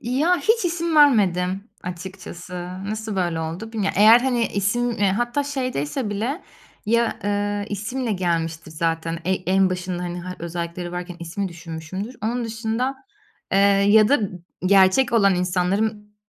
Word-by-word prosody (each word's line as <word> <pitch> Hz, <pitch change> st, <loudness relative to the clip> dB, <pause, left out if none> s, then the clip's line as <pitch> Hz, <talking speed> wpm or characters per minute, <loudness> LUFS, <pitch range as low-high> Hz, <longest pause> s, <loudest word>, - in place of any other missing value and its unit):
Ya 285 Hz, +10 st, +2 dB
hiç 445 Hz, -1 st, +2 dB
isim 335 Hz, -2 st, -1 dB
vermedim 200 Hz, -7 st, +3 dB
açıkçası. 180 Hz, 0 st, -8 dB, 0.3 s
Nasıl 215 Hz, 0 st, -4 dB
böyle 175 Hz, -3 st, 0 dB
oldu 170 Hz, +8 st, -5 dB
bilmiyo 210 Hz, -3 st, -1 dB
Eğer 220 Hz, +4 st, +8 dB
hani 245 Hz, -3 st, +1 dB
isim, 205 Hz, +5 st, 0 dB
eee, 205 Hz, -4 st, +1 dB
hatta 240 Hz, +7 st, 0 dB
şeydeyse 255 Hz, -, -2 dB
bile 235 Hz, -, -2 dB, 0.4 s
ya, 235 Hz, +1 st, +1 dB
eee, 205 Hz, 0 st, -1 dB
isimle 225 Hz, +4 st, -2 dB
gelmiştir 165 Hz, -3 st, -2 dB
zaten, 165 Hz, +1 st, -2 dB
ey 185 Hz, 0 st, 0 dB
en 190 Hz, 0 st, +3 dB
başında, 180 Hz, -1 st, -3 dB
hani, 175 Hz, 0 st, -4 dB
ha 185 Hz, +1 st, -7 dB
özellikleri 170 Hz, +1 st, -5 dB
varken 180 Hz, 0 st, -5 dB
ismi 185 Hz, +4 st, -3 dB
düşünmüşümdür. 170 Hz, +7 st, -7 dB
Onun 235 Hz, +2 st, -1 dB
dışında, 225 Hz, +4 st, -2 dB, 0.6 s
eee, 195 Hz, -, +4 dB, 0.3 s
ya 215 Hz, +1 st, +6 dB
da 285 Hz, -4 st, +4 dB, 0.5 s
gerçek 195 Hz, +6 st, +5 dB
olan 200 Hz, -4 st, +4 dB
insanların 200 Hz, +4 st, -1 dB
200 Hz, 140 wpm, -22 LUFS, 180-235 Hz, 0.6 s, Eğer